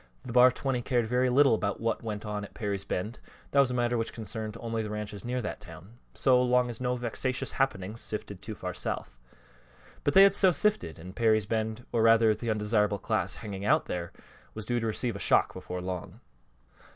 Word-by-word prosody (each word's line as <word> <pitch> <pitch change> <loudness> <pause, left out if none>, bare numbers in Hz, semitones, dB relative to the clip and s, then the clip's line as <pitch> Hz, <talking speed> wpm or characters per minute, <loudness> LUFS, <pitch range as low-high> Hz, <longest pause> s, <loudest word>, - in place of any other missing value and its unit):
The 120 - -6
Bar 125 0 +8
20 130 0 -2
cared 120 -1 +1
very 125 +3 +1
little 135 +1 +5
about 100 -2 -1
what 115 0 -1
went 110 -1 -5
on 105 -1 -3
at 100 - -11
Perry's 100 -2 -3
Bend 105 +5 -3 0.3
that 140 - +3
was 135 -2 +5
a 125 - -2
matter 120 -1 +1
which 115 - -3
concerned 110 -1 -5
only 115 -1 -2
the 105 - -4
ranches 105 -1 -5
near 125 0 -2
that 105 - -5
town 110 +8 -13 0.2
so 125 -1 +4
long 125 -1 +2
as 115 - -9
no 125 0 0
vexatious 125 +2 -3
happenings 110 -5 -1
sifted 100 -3 -5
too 110 - -6
far 90 -2 -5
south. 60 -7 -5 0.8
But 145 - 0
they 195 - +10
had 200 0 +6
so 195 -2 +5
sifted, 165 - 0
and 90 +3 -10
Perry's 110 -3 +3
Bend, 110 +1 -2
or 115 - +1
rather 115 -1 +5
the 115 +2 -5
undesirable 105 -1 +1
class - - -1
hanging 100 -2 -6
out 150 +9 +3
there, 85 -1 -4 0.4
was 110 -1 -5
due 120 -1 0
to 115 - -2
receive 115 +1 -1
a - - -6
shock - - +3
before 90 0 -6
long. 90 -1 -6
115 Hz, 210 wpm, -29 LUFS, 105-125 Hz, 0.8 s, they